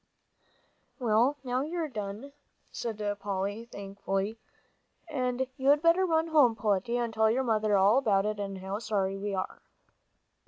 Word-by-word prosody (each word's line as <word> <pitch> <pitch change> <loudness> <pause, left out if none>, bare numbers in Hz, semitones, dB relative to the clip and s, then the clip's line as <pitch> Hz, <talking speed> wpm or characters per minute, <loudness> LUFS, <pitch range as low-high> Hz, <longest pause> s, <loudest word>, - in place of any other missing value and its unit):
"Well, 240 +3 +2
now 250 0 -1
you're 320 +2 -2
done," 215 +2 -6 0.4
said 230 -2 -4 0.2
Polly, 200 +3 -3
thankfully, 200 0 -4 0.7
"and 255 -4 -1
you'd 285 +3 +3
better 345 +3 +4
run 325 0 +1
home, 280 -8 +5
Peletiah, 215 +3 0
and 230 -1 -4
tell 220 0 +3
your 255 +4 +1
mother 215 -3 +2
all 200 +6 +5
about 205 -6 +2
it, 210 0 -2
and 195 -1 -4
how 190 +2 -4
sorry 200 -3 -1
we 200 0 -2
are." 185 - -4
220 Hz, 145 wpm, -29 LUFS, 200-260 Hz, 0.7 s, home